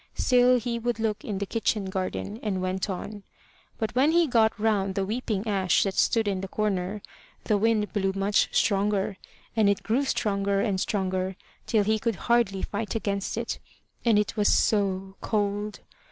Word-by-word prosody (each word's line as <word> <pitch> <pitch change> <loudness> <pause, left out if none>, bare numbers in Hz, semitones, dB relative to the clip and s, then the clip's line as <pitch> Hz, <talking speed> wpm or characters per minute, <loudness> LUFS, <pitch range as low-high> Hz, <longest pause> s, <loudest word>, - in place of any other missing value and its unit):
Still 250 0 +4
he 235 0 -3
would 235 -1 -2
look 220 -2 -1
in 205 -3 -3
the 200 - -2
kitchen 215 -1 -1
garden, 190 +3 -3
and 200 -4 -2
went 185 +2 -2
on. 205 +2 -5 0.6
But 220 -2 -2
when 275 +5 +3
he 340 0 +5
got 230 -5 +2
round 200 -3 +1
the 195 - 0
weeping 215 -1 -2
ash 195 -3 +2
that 195 - -1
stood 225 +3 +2
in 195 -2 -1
the 195 - -4
corner, 200 -1 -2 0.4
the 215 - +1
wind 215 0 +1
blew 195 -2 +1
much 195 +1 +2
stronger, 200 -1 +1 0.4
and 215 -3 +4
it 200 - 0
grew 240 +6 +1
stronger 200 -5 0
and 200 -3 0
stronger 190 -2 -1 0.3
till 215 -3 +3
he 215 +1 +1
could 230 0 -1
hardly 235 -3 +1
fight 210 +2 -3
against 200 -3 -2
it. - - -3 0.4
And 230 -3 +4
it 210 +1 0
was 210 -2 +3
so 195 -2 +1
cold! 205 0 -1
205 Hz, 175 wpm, -26 LUFS, 195-225 Hz, 0.6 s, he